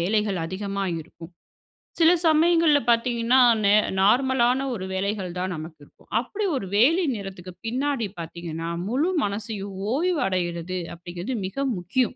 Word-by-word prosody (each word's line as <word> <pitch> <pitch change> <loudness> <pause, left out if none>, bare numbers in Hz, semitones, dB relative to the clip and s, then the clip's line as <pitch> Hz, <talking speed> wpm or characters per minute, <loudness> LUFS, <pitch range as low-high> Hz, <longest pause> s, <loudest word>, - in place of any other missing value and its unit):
வேலைகள் 200 +1 0
அதிகமா 195 +3 -3 0.2
இருக்கும். 165 +1 -12 0.7
சில 330 0 +6 0.2
சமயங்கள்ல 320 -1 +4
பார்த்தீங்கன்னா, 235 +1 +3 0.3
நே 200 - +5 0.3
நார்மலானா 250 +4 +3
ஒரு 190 -3 -5
வேலைகள் 190 -2 -2
தான் 185 0 -2
நமக்கு 155 0 -8
இருக்கும். - - -26
அப்பிடி 405 - -3
ஒரு 195 - -5
வேலை 325 - +4
நேரத்துக்கு 190 -3 -8
பின்னாடி 255 0 -1
பார்த்தீங்கன்னா, 165 0 -5 0.2
முழு 275 - +1
மனசையும் 205 -1 -4 0.2
ஓய்வு 345 +3 +1
அடையிறது 180 -1 -2
அப்பிடிங்கறது 175 +7 -6
மிக 195 - -12 0.2
முக்கியம். 215 +9 0
205 Hz, 130 wpm, -24 LUFS, 180-260 Hz, 0.7 s, சில